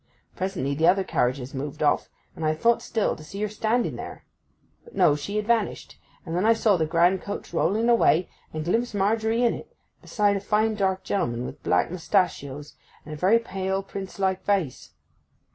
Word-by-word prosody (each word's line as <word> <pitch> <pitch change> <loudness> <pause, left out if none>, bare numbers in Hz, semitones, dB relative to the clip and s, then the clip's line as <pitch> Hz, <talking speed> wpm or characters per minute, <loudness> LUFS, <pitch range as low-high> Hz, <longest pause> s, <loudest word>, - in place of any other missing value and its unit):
Presently 185 -8 -2
the 160 +4 +2
other 190 +2 +4
carriages 125 -4 -1
moved 145 +3 -4
off, 145 - +2 0.3
and 160 - -6
I 155 0 +1
thought 235 +8 +2
still 225 -2 -1
to 155 - -12
see 195 +6 -8
her - - +1
standing 220 +3 -1
there. - - -8 0.6
But 470 - -16
no, 145 - +4
she 175 +8 -5
had 210 0 0
vanished; 230 -2 -1 0.3
and 165 - -4
then 180 - +1
I 225 +1 +5
saw 225 -2 +3
the 160 -3 0
grand 175 +3 +3
coach 200 -3 -6
rolling 215 +7 +1
away, 225 -7 +4 0.2
and 155 0 -4
glimpsed 230 +5 0
Margery 220 +4 +1
in 240 - +3
it, - - -10 0.2
beside 205 -2 +1
a - - -5
fine 215 +2 +1
dark 190 -2 0
gentleman 125 -14 -1
with - - -8
black 90 - +1
mustachios, 160 -6 -1 0.3
and 155 - -7
a - - -4
very 185 +9 +4
pale 190 -3 -2
prince 195 -1 -7
like 190 -1 0
face. 190 -10 -1
190 Hz, 190 wpm, -25 LUFS, 155-215 Hz, 0.6 s, I